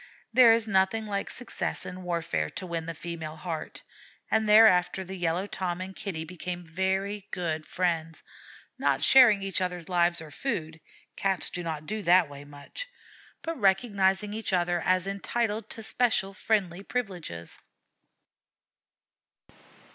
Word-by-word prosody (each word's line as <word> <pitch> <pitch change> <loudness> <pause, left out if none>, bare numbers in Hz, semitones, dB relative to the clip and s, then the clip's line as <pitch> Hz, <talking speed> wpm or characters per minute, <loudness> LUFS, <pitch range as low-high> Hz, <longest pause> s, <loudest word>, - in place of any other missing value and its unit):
There 245 -1 +8
is 225 0 +3
nothing 195 +2 +2
like 200 -1 -3
success 245 - -2
in 185 +1 -7
warfare 170 -2 -2
to 185 - -7
win 165 -2 -4
the 165 - -4
female 160 -1 -6
heart, 160 0 -6 0.5
and 220 -1 +2
thereafter 190 -4 +6
the 190 +1 -7
Yellow 175 +1 -1
Tom 185 -3 -3
and 190 +1 -6
Kitty 180 -6 -4
became 175 +1 -6
very 190 +4 -2
good 160 -3 -3
friends, 165 -3 -2 0.6
not - - +1
sharing 235 -7 +7
each 195 -2 -1
other's 180 -2 -3
lives 175 -1 +2
or 160 -2 -9
food, 160 - -4 0.3
Cats 195 -1 0
do 180 - -4
not 160 -3 -4
do 215 +5 -3
that 180 -2 +5
way 140 0 -10
much, 145 - -8 0.6
but 330 -3 -4
recognizing 195 0 +2
each 215 -2 -3
other 175 -1 +1
as 185 0 +2
entitled 210 +2 -2
to 225 - -7
special 220 -4 +1
friendly 195 -3 0
privileges. 180 - -5
185 Hz, 140 wpm, -28 LUFS, 170-205 Hz, 0.6 s, There